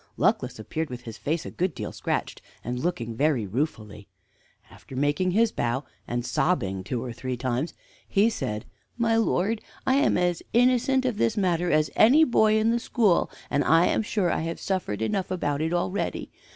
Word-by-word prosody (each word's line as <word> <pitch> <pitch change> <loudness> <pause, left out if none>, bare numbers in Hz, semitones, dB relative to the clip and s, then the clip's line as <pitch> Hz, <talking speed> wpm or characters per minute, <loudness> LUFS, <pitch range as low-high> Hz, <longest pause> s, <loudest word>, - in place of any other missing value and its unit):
Luckless - - +1
appeared 155 +9 -4
with 125 -1 -7
his 115 -3 -9
face 155 +2 -2
a - - -6
good 180 -3 -1
deal - - -5
scratched, - - -3 0.2
and 125 +1 -3
looking 120 -8 -2
very 140 -4 +1
ruefully. 105 -3 -4 0.6
After 135 - -12
making 145 +7 +1
his 220 +4 +3
bow 120 +4 -1 0.2
and 120 0 -2
sobbing 110 - 0
two 115 +4 -3
or 125 -2 -5
three 125 +1 -4
times, 130 +5 -2 0.3
he 200 +3 +3
said: 105 - -3 0.3
"My 230 -1 +2
lord, 220 -1 +1 0.2
I 260 +1 +3
am 285 - +3
as 175 -1 +1
innocent 255 +2 +3
of 245 -5 0
this 115 - +1
matter 180 -3 +1
as 155 -3 +2
any 270 +9 +6
boy 220 -6 +4
in 220 +1 +2
the 235 - +1
school, 220 -7 +2 0.2
and 145 - +2
I 165 +2 +5
am - - +2
sure 205 -4 0
I - - 0
have 165 +1 -4
suffered 175 - -2
enough 185 - -1
about 150 -6 -1
it 160 +1 0
already. 175 +3 -2
165 Hz, 185 wpm, -26 LUFS, -, 0.6 s, any